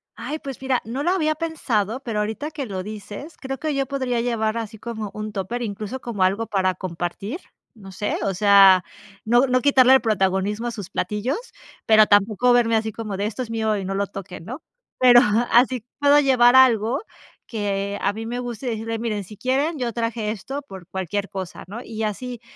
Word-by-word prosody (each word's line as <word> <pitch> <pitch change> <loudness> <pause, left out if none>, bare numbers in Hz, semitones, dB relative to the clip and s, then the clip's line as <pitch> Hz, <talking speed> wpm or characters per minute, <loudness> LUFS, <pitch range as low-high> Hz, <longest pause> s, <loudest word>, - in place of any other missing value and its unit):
Ay, 305 +2 -5
pues 270 -4 -8
mira, 265 -2 0
no 250 +6 -3
lo 345 - +2
había 310 -5 +1
pensado, 255 - -1
pero 225 -4 -2
ahorita 220 +8 -3
que 290 -3 -5
lo 190 -5 -4
dices, 215 - -8
creo 270 0 -5
que 310 -2 -2
yo 275 0 0
podría 260 -3 -2
llevar, 230 -2 -1
así 225 -1 -5
como 220 -3 -5
un 215 0 -5
tupper, 205 +5 -4
incluso, 215 +3 -4
como 215 -6 -2
algo 200 +5 +1
para 185 -2 +1
compartir, 185 - -5 0.4
no 195 -3 -12
sé, 205 +2 -2
o 195 - 0
sea, 195 -1 +6 0.4
no 240 +4 +4
no 255 -1 +2
quitarle 265 -2 +6
el 265 - +6
protagonismo 205 0 0
a - - -2
sus 205 -5 -7
platillos, 210 - -2 0.5
pero 215 -1 +6
tampoco 210 +4 +3
verme 230 -2 +3
así 220 0 0
como 215 -2 -5
de: 200 - -1
"Esto 240 +4 -4
es 230 - -9
mío 220 -2 0
y 195 - -4
no 195 - -3
lo 200 +1 -1
toquen", 190 -4 -9
¿no?, 255 - -7 0.4
pero 245 -1 +8 0.3
así 245 -1 +4 0.2
puedo 285 0 +6
llevar 255 -3 +5
algo, 245 -1 +5 0.5
que 200 -2 -3
a 200 - +2
mí 225 +2 -6
me 240 +2 -3
guste, 245 0 -6
y - - +1
decirles, 225 0 -3
miren, 215 -3 -2
si 205 +2 -13
quieren, 280 +6 0
yo 240 -4 -2
traje 230 -2 -2
esto 270 +7 -6
por 190 -8 -11
cualquier 190 +2 -3
cosa, 190 -3 -6
¿no?, 220 +6 -7
y 220 -1 -7
así, 240 +3 -4
225 Hz, 200 wpm, -23 LUFS, 200-255 Hz, 0.5 s, pero